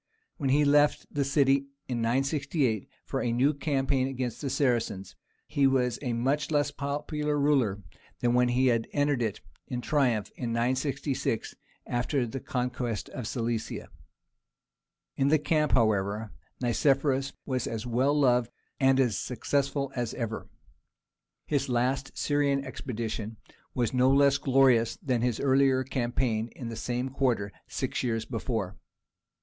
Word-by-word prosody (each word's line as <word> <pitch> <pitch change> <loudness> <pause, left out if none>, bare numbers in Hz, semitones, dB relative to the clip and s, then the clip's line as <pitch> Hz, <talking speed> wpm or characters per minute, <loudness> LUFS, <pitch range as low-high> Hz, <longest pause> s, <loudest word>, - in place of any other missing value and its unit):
When 140 -5 -1
he 145 +2 +4
left 145 +1 +4
the 145 - +1
city 140 0 +2 0.2
in 120 -2 -2
968 135 - 0 0.2
for - - -2
a 120 - 0
new 130 +5 +3
campaign 135 -2 0
against 130 -3 -4
the 140 - -2
Saracens, 115 -9 0 0.3
he 140 -3 +2
was 125 -3 +1
a 125 -4 -2
much 135 +5 0
less 145 -2 +1
popular 150 +1 -2
ruler 130 -9 +2 0.4
than 120 -1 +2
when 125 0 +4
he 125 +2 +2
had 115 -3 +2
entered 145 -3 +1
it 110 -3 -2 0.3
in 125 - -3
triumph 125 -6 +1
in 120 -2 -3
966 130 +1 -1 0.3
after 125 +2 0
the 120 +3 -5
conquest 125 -3 -3
of 125 -4 -5
Cilicia. 115 -2 -3 1.3
In 135 - +2
the 155 +2 +5
camp, 150 0 +1
however, 105 -2 +1 0.3
Nicephorus 135 +2 +2
was 130 -3 -1
as 115 0 -4
well 130 +5 +2
loved 125 -3 +3 0.3
and 135 -1 +4
as 125 -5 +2
successful 140 +2 -1
as 120 -3 -2
ever. 115 -2 -4 1.0
His 140 -2 0
last 125 +3 0
Syrian 140 -1 +1
expedition 110 -3 -5 0.4
was 120 -2 0
no 130 0 +4
less 140 +1 +4
glorious 130 -4 +4
than 125 -4 -1
his 120 -2 0
earlier 135 -1 +3
campaign 120 -3 -1
in 120 -3 -6
the 115 - -5
same 125 +3 -2
quarter 125 -7 0 0.2
six - - -2
years 115 -3 -1
before. 110 -5 -3
130 Hz, 140 wpm, -28 LUFS, 120-140 Hz, 1.3 s, the